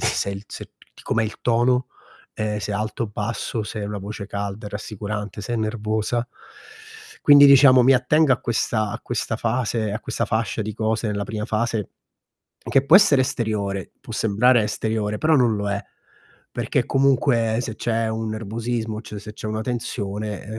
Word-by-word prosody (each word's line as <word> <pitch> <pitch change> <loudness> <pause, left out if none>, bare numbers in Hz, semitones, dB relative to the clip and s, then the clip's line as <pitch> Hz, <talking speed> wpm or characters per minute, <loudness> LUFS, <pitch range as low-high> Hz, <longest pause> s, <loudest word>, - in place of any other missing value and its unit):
s - - -3
se 100 0 -2
se - - -9 0.3
di - - -14
com'è 115 - 0
il 110 - -6
tono, 125 +2 +2 0.5
ehm, 105 0 -2
se 105 - -4
è - - -2
alto 110 +3 -3
o - - -4
basso, 110 +1 -3
se 105 0 -6
è - - -3
una 105 0 -4
voce 100 +1 -7
calda 100 +1 -5
e - - -7
rassicurante, 105 0 -5
se 120 - -4
è - - 0
nervosa. 110 +2 -1 0.9
Quindi 145 -1 +8
diciamo 130 -2 +7
mi 130 +2 +6
attengo 135 +3 +3
a 125 - 0
questa 110 -2 -1
a - - -6
questa - - -2
fase, 115 -2 -1
a 110 - -3
questa 115 - -2
fascia 110 0 -1
di 110 - -4
cose 110 +1 -1
nella 100 -1 -2
prima 105 -1 -4
fase, 110 -2 -1 0.7
che 135 0 +1
può 160 - +9
essere 150 -10 +5
esteriore, 110 -7 -2
può 120 -4 -10
sembrare 110 +3 +3
esteriore, 105 0 -2
però 155 0 +3
non 120 -4 +3
lo 100 0 -2
è, 100 0 -2 0.7
perché - - -1
comunque 125 -4 +2
se 110 -3 -4
c'è 115 -1 -1
un 110 0 -3
nervosismo, 110 +1 -3
c 105 - -9
se 105 0 -9
c'è 110 - -7
una 110 0 -2
tensione, 105 -4 -4
110 Hz, 180 wpm, -22 LUFS, 105-120 Hz, 0.9 s, può